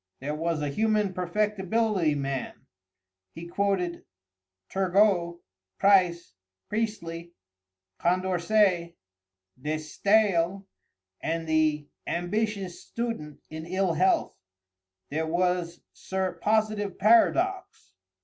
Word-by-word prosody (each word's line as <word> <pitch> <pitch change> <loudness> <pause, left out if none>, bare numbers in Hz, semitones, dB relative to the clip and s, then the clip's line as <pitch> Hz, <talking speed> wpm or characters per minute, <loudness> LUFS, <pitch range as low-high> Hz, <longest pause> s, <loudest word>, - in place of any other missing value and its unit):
There 145 +3 -3
was 160 0 -1
a 145 - -1
human 210 +4 +1
perfectibility 195 -1 0
man. 135 -2 -4 0.7
He 165 - -7
quoted 180 -1 -1 0.6
Turgôt, 185 -2 +2 0.4
Price, 180 - +3 0.4
Priestly, 170 -6 -3 0.7
Condorcêt, 180 0 +2 0.7
De 150 +3 -1
Staël, 195 +3 +1 0.6
and 165 0 -2
the 155 -2 +1 0.2
"Ambitious 195 +1 -2
Student 230 -11 -5
in 160 +1 -7
Ill 185 0 0
Health." 185 +4 +2 0.8
There 160 +2 -1
was 175 0 0
Sir 190 -1 -2
Positive 215 -2 +1
Paradox. 340 - +2
180 Hz, 85 wpm, -27 LUFS, 165-205 Hz, 0.8 s, Price